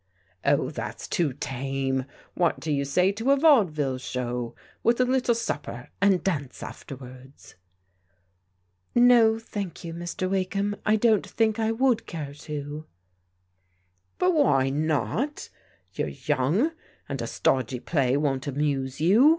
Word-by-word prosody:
" 90 - -37
Oh, - - +2
that's - - -6
too 165 -5 +1
tame. 135 0 -2 0.3
What 175 -2 +1
do 160 - -3
you 140 -1 +1
say 180 +7 +3
to 225 +6 -2
a 280 - +6
vaudeville 170 - +3
show, 125 -2 -3 0.3
with 235 +1 +2
a 255 - +4
little 250 -2 +2
supper 230 - -4
and 195 -2 +4
dance 145 -9 -2
afterwards? 130 -6 -11 0.5
" 90 0 -44
" 90 0 -45
No, 240 -2 +6
thank 205 -6 -6
you, 165 -1 -5
Mr. 175 +2 -3
Wakeham, 195 +2 -1
I 215 - +5
don't 220 -2 +3
think 225 -1 +1
I 220 0 +1
would 240 0 +1
care 150 -4 -5
to." 150 +1 -6 1.3
"But 365 0 +3
why 135 - +3
not? 155 - -1 0.4
You're - - -2
young, 180 - +1 0.4
and 135 -3 -4
a 115 - -3
stodgy 125 0 0
play 135 -1 +1
won't 140 -3 -1
amuse 140 -2 -1
you. 215 - +6
155 Hz, 140 wpm, -26 LUFS, 130-220 Hz, 1.3 s, a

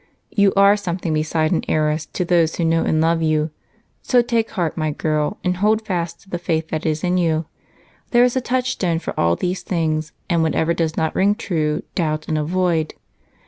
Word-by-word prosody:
"You 200 -2 +4
are 200 +1 +6
something 180 -4 -3
besides 155 +1 0
an - - 0
heiress 155 0 0
to 180 - -3
those 170 -2 +2
who 170 - -1
know 165 0 +2
and 155 - +1
love 165 +1 +2
you, 155 -1 +1 0.5
so 245 -2 +3
take 230 -1 0
heart, 175 -6 -2
my 155 -2 -1
girl, 150 +4 -1
and 180 -1 0
hold 215 +3 +2
fast 170 -4 -3
to 195 - -21
the 175 - -2
faith 160 -2 -1
that 155 0 -2
is 155 0 -1
in 180 0 +1
you. 165 -2 +1 0.6
There 240 0 +5
is 250 0 +2
a 260 - +1
touchstone 250 -9 0
for 165 - -4
all 85 0 +3
these 180 - -2
things, 155 -3 -1 0.2
and 170 -3 +2
whatever 160 +1 +1
does 165 -1 -1
not 160 0 0
ring 200 +2 +2
true, 155 -8 -1
doubt 155 -3 -1
and 155 - -1
avoid. 165 0 0
165 Hz, 200 wpm, -20 LUFS, 155-185 Hz, 0.6 s, are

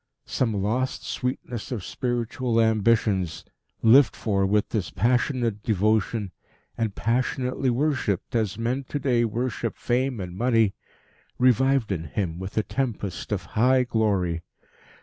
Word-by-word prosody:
Some 115 -4 0
lost 125 +5 -1
sweetness 125 -2 -4
of 115 -7 -3
spiritual 120 -1 -1
ambitions, 110 -5 +2 0.4
lived 115 -1 +6
for 100 -3 0
with 105 +1 +1
this 100 -7 -2
passionate 120 -2 0
devotion, 105 0 +1 0.4
and 110 -4 -2
passionately 130 +2 0
worshipped 125 - 0
as 110 -4 0
men 120 +4 -1
to 145 - -4
day 125 -4 +2
worship 115 0 -2
fame 125 0 0
and 90 -2 -6
money, 115 -2 +2 0.6
revived 130 -1 +3
in 85 -4 -2
him 85 +2 -3
with 95 +3 -7
a 110 - +3
tempest 110 -7 -3
of - - -1
high 130 +3 +4
glory. 100 -8 0
115 Hz, 130 wpm, -25 LUFS, 100-125 Hz, 0.6 s, lived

